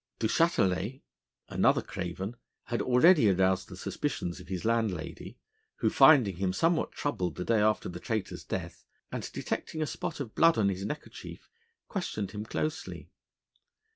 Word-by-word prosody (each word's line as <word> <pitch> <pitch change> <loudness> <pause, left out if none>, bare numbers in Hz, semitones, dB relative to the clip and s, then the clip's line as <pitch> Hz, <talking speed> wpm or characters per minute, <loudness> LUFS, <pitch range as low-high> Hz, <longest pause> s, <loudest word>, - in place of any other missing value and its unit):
Du - - -2
Châtelet, 115 - +1 0.4
another - - +2
craven, 95 +5 -5 0.3
had 120 - -2
already 130 - +5
aroused 95 0 +2
the - - -9
suspicions 85 0 -3
of - - -12
his 90 +1 -4
landlady: 110 -8 -2 0.4
who, 110 - +1
finding 135 - +6
him 95 0 0
something 165 - +2
troubled 90 - -2
the 90 - -4
day 115 -2 +3
after 110 0 +2
the 85 0 -6
traitor's 110 +1 -3
death, - - -5 0.3
and - - -4
detecting 160 - -4
a 155 - +1
spot - - -4
of 120 -6 -5
blood 165 0 +5
on 100 -3 +3
his 95 0 -3
neckerchief, 150 +8 -8 0.4
questioned 110 - -3
him 105 0 -5
closely. 155 +7 -4
110 Hz, 150 wpm, -30 LUFS, 95-140 Hz, 0.4 s, finding